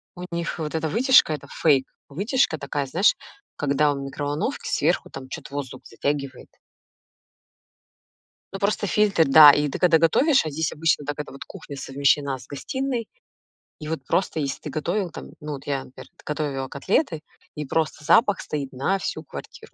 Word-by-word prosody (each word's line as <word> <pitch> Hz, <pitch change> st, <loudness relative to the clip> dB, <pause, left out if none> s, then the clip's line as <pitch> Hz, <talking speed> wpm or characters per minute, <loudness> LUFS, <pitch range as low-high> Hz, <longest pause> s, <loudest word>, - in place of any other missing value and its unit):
у 180 Hz, -, -8 dB
них 170 Hz, 0 st, -3 dB
вот 155 Hz, 0 st, -4 dB
эта 160 Hz, -1 st, -1 dB
вытяжка- 245 Hz, -, +5 dB
это 140 Hz, -1 st, -7 dB
фейк, 140 Hz, -5 st, +4 dB, 0.2 s
вытяжка 200 Hz, -, 0 dB
такая, 140 Hz, -1 st, -3 dB
знаешь, 180 Hz, +9 st, +3 dB, 0.4 s
когда 145 Hz, +1 st, +2 dB
в 140 Hz, -, -5 dB
микроволновке 145 Hz, -, -3 dB
сверху 165 Hz, +4 st, +1 dB
там 130 Hz, -1 st, -9 dB
чё-то 140 Hz, -, -8 dB
воздух 140 Hz, -3 st, -6 dB
затягивает. 140 Hz, +1 st, -4 dB, 2.0 s
Ну, 195 Hz, -, -5 dB
просто 205 Hz, +1 st, 0 dB
фильтр, 200 Hz, -5 st, +3 dB
да, 150 Hz, +1 st, +10 dB
и 150 Hz, 0 st, +1 dB
ты -, -, -4 dB
когда 170 Hz, -3 st, +5 dB
готовишь, 255 Hz, -, +4 dB
а 155 Hz, -, -3 dB
здесь 155 Hz, +2 st, -2 dB
обычно 155 Hz, -2 st, +1 dB
так: 145 Hz, +1 st, -4 dB
это 150 Hz, -, -6 dB
вот 135 Hz, -, -9 dB
кухня 160 Hz, -7 st, -10 dB
совмещена 140 Hz, 0 st, +1 dB
с 125 Hz, -, -14 dB
гостиной. 245 Hz, -, -3 dB, 0.7 s
И 155 Hz, -, -7 dB
вот 155 Hz, -5 st, -4 dB
просто 180 Hz, 0 st, 0 dB
если 140 Hz, -1 st, -3 dB
ты 150 Hz, -, -7 dB
готовил 175 Hz, +6 st, -2 dB
там, -, -, -9 dB
ну, 150 Hz, 0 st, -6 dB
вот 135 Hz, +1 st, -10 dB
я, 135 Hz, -2 st, -2 dB
например, 130 Hz, -, -13 dB, 0.2 s
готовила 145 Hz, -3 st, -3 dB
котлеты, 165 Hz, -, 0 dB, 0.4 s
и 150 Hz, -, -3 dB
просто 155 Hz, +1 st, -2 dB
запах 205 Hz, -, +4 dB
стоит 140 Hz, -3 st, -4 dB
на 140 Hz, +10 st, 0 dB
всю 155 Hz, -3 st, -4 dB
квартиру. -, -, -10 dB
150 Hz, 170 wpm, -24 LUFS, 140-175 Hz, 2.0 s, да